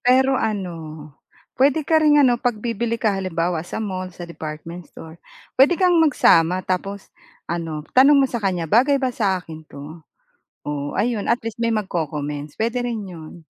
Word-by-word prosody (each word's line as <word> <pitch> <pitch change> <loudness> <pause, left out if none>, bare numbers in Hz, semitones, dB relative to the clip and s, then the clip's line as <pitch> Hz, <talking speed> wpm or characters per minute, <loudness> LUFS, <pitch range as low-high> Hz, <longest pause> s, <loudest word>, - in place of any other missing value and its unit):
Pero 260 +2 +3
ano 195 -5 -2 0.8
puwede 280 +3 +2
ka 320 +1 +3
ring 300 -1 +5
ano 250 -4 +4
pagbibili 230 -1 -1
ka 220 -4 +1
halimbawa 175 -3 -1
sa 175 - -7
mall 185 -4 -4
sa 175 0 -9
department 165 +1 -8
store, 160 +1 -12 0.3
puwede 290 +7 +5
kang 355 -2 +4
magsama 185 - +4
tapos 195 +2 -4 0.3
ano, 165 -3 -4
tanong 280 +3 +6
mo - - +2
sa 240 -3 -4
kanya, 185 -4 -1
"Bagay 250 - +3
ba 260 -2 -1
sa 195 -5 0
akin 160 -3 -10
'to?" 150 +4 -10 0.6
O 145 -1 -4
ayon 215 0 -1
atleast 230 -1 -1
may 230 0 +1
magco-comments 150 -7 -4
puwede 230 +3 -1
rin 230 -4 -3
'yon. 165 -2 -11
200 Hz, 160 wpm, -21 LUFS, 165-245 Hz, 0.8 s, tanong